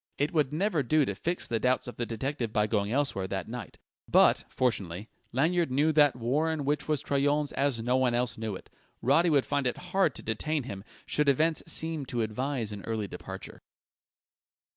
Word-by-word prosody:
It 145 +4 0
would 150 -4 +2
never 170 0 +1
do 150 +3 +3
to - - -2
fix 175 +1 -2
the 115 - -1
doubts 125 +2 +1
of 125 - -8
the 120 - -2
detective 120 0 -3
by 105 -1 +2
going 105 -1 0
elsewhere 125 -8 0
that 95 -1 -3
night. 120 -3 -7 0.3
But, - - +5
fortunately, 100 -5 -1 0.2
Lanyard 165 +6 +2
knew 145 +5 +2
that 145 -3 +5
warren 145 +5 0
which 145 +1 0
was 150 -3 0
Troyon's 145 +1 +1
as 140 -4 0
no 125 +2 +2
one 125 -2 +2
else 125 0 0
knew 110 -3 -4
it; - - -12 0.3
Roddy 160 +7 +4
would 145 -4 +3
find 140 -2 0
it 125 - -2
hard 180 -5 0
to - - -7
detain 145 +7 -1
him, 100 -6 -7 0.2
should 150 -1 +1
events 155 +4 +2
seem 160 -3 -1
to 120 -2 -1
advise 115 +1 -2
an 100 -1 -7
early 110 -2 -2
departure. - - -8
135 Hz, 190 wpm, -29 LUFS, 115-150 Hz, 0.3 s, But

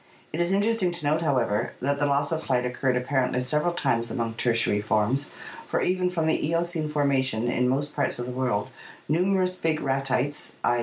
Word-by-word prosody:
It 160 - -3
is 175 +1 +1
interesting 205 -1 +2
to 170 -3 -4
note, 155 +3 +2
however, 120 -8 0
that 140 +2 0
the 145 - +2
loss 140 +1 +1
of 160 -1 -1
flight 125 -4 0
occurred 125 +1 0
apparently 125 0 0
several 150 +6 0
times 115 -7 0
among 115 -1 -2
Tertiary 115 -3 +1
forms, 110 +6 0 0.4
for - - 0
even 180 0 +1
from 170 -3 -1
the 160 - +1
Eocene 165 0 -1
formation 135 -6 +1
in 125 +1 +1
most 145 +3 -1
parts 140 -2 0
of 120 - -4
the 125 - -5
world 125 -5 -1 0.4
numerous 185 +3 +1
big 160 -2 0
Ratites 135 +1 -1
(*". - - -30
140 Hz, 190 wpm, -26 LUFS, 125-165 Hz, 0.4 s, interesting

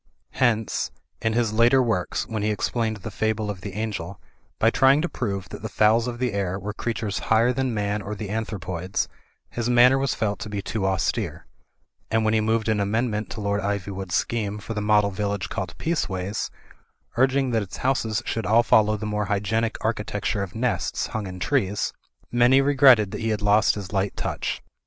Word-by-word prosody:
Hence, 115 -4 +1 0.3
in 115 0 +1
his 115 -2 +1
later 120 +4 +5
Avorks, 110 -7 -1
when 110 -2 -3
he 105 - +1
explained 110 +1 -1
"The 95 - -7
Fable 110 -1 -1
of 95 -3 -9
the 100 0 -6
Angel," 100 -3 -4 0.4
by 115 - +3
trying 135 +3 +5
to - - +1
prove 100 - -4
that - - -8
the - - -4
fowls 110 +2 +3
of 120 -1 -4
the 125 -3 -1
air 95 -2 -1
were 100 +2 -5
crea 115 +2 -3
tures 105 -3 -2
higher 115 +3 +3
than 130 0 -1
man 105 -1 -1
or 105 +2 -5
the 105 -1 -6
anthropoids, 95 -5 -2 0.4
his 120 0 -2
manner 125 +2 +6
was 135 -1 0
felt 105 -2 -1
to 105 - -6
be 105 -1 -3
too 100 0 -2
austere; 95 -2 -1 0.6
and 110 0 +1
when 110 - +2
he 110 - +3
moved 110 0 +1
an 110 -1 +2
amendment 105 +1 -1
to 110 - -6
Lord 100 0 0
Ivywood's 95 -2 -3
scheme 105 -3 -1
for 105 +2 -6
the 105 - -2
model 105 -1 +3
tillage 100 0 -2
called 95 -5 -4
Peaceways, 100 - -2 0.7
urging 130 +1 +2
that 115 -2 +2
its 95 -2 -7
houses 115 -5 +1
should 115 -4 -2
all 115 +3 +5
follow 110 -1 +4
the 105 - -5
more 105 0 -1
hygienic 105 +3 0
architecture 105 -2 -1
of 95 -3 -5
nests 110 -9 -1
hung 105 -3 -3
in 90 0 -7
trees, 100 +2 0 0.4
many 120 +2 +5
regretted 130 -7 +5
that - - -5
he 115 - 0
had 105 -2 -1
lost 105 +1 +4
his 100 -2 -7
light 95 0 0
touch. - - -3
105 Hz, 195 wpm, -24 LUFS, 100-115 Hz, 0.7 s, manner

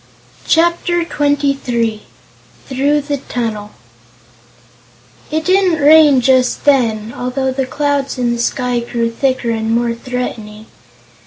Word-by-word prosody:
Chapter 345 +1 +1
Twenty 285 -3 0
Three 230 -5 -3 0.6
Through 285 +3 0
the 285 0 -3
Tunnel 225 -5 -4 1.6
It 315 +1 -2
didn't 370 -3 +2
rain 295 -2 +6
just 255 +1 +2
then, 230 -6 +1
although 260 +1 -2
the 260 0 -2
clouds 285 -1 -1
in 245 -1 0
the 235 - -4
sky 250 0 -1
grew 235 -1 -2
thicker 255 -1 -1
and 225 0 -2
more 235 0 0
threatening. 230 -3 -6
260 Hz, 115 wpm, -16 LUFS, 235-290 Hz, 1.6 s, rain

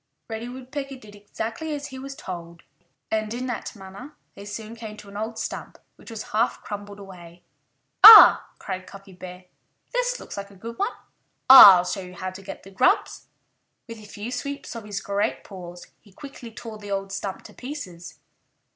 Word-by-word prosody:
Reddy 225 +2 -5
Woodpecker 265 +2 -7
did 215 -5 -15
exactly 225 +9 -6
as 290 0 -7
he 265 - -9
was 275 +1 -8
told. 170 - -9 0.5
And 215 -1 -1
in 250 +1 -4
that 245 -2 -5
manner 200 +9 -12 0.2
they 200 - -12
soon 215 +2 -8
came 220 -2 -9
to 205 - -13
an 200 - -14
old 220 +2 -5
stump - - -6 0.2
which - - -15
was 225 -2 -8
half 225 +3 0
crumbled 205 0 -8
away. 175 -3 -13 0.6
"Ah!" 440 -1 +11
cried 185 -1 -7
Cuffy 195 -1 -13
Bear. 180 0 -11 0.5
"This - - -1
looks - - -10
like 200 0 -6
a 200 - -17
good 230 +5 -9
one.... 400 - +1 0.6
I'll 190 -9 +11
show 195 +2 -4
you 180 0 -11
how 185 +1 -5
to 185 +1 -11
get 195 0 -10
the 195 - -14
grubs." 255 +7 +1 0.6
With 230 -1 -9
a 210 - -13
few 210 +3 -8
sweeps 280 +3 -6
of 230 -2 -8
his 205 -2 -5
great 200 +1 -2
paws 180 -3 -11
he 205 - -22
quickly 255 +1 -11
tore 220 -1 -10
the 205 -1 -10
old 195 0 -3
stump 195 0 -5
to - - -14
pieces. 220 - -9
210 Hz, 185 wpm, -24 LUFS, 195-245 Hz, 0.6 s, Ah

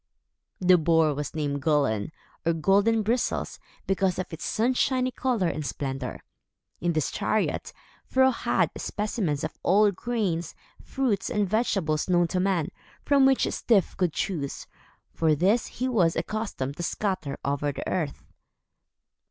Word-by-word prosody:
The 180 -1 +5
Boar 160 -1 +3
was 145 +1 -5
named 145 -2 -2
Gullin, 140 -7 +1 0.3
or 165 - +2
Golden 200 +7 +3
Bristles 235 +4 -1 0.3
because 190 -1 +1
of 185 - -4
its 160 - -6
sunshiny 255 +2 +1
color 245 -6 0
and 155 -2 -2
splendor. 135 -3 -4 0.6
In 175 0 0
this 155 -3 0
chariot, 215 - -1 0.4
Fro 260 0 +4
had 235 - 0
specimens 205 - -2
of - - -5
all 200 +4 +4
the 205 - +4
grains, 200 -5 -2 0.3
fruits, 255 -8 -1
and 210 -2 0
vegetables 190 -7 0
known 175 -1 +3
to 180 - 0
man, 185 -3 +1 0.4
from 280 -2 +5
which 270 -1 +3
Styf 210 -6 +1
could 180 -3 +1
choose, 145 -7 -3 0.5
for 160 -2 +2
these 200 +9 +2
he 255 - -3
was 185 -10 +2
accustomed 165 -7 -3
to - - -4
scatter 180 -5 -2
over 145 +1 0
the - - -6
earth. 155 -6 -2
180 Hz, 145 wpm, -26 LUFS, 155-215 Hz, 0.6 s, The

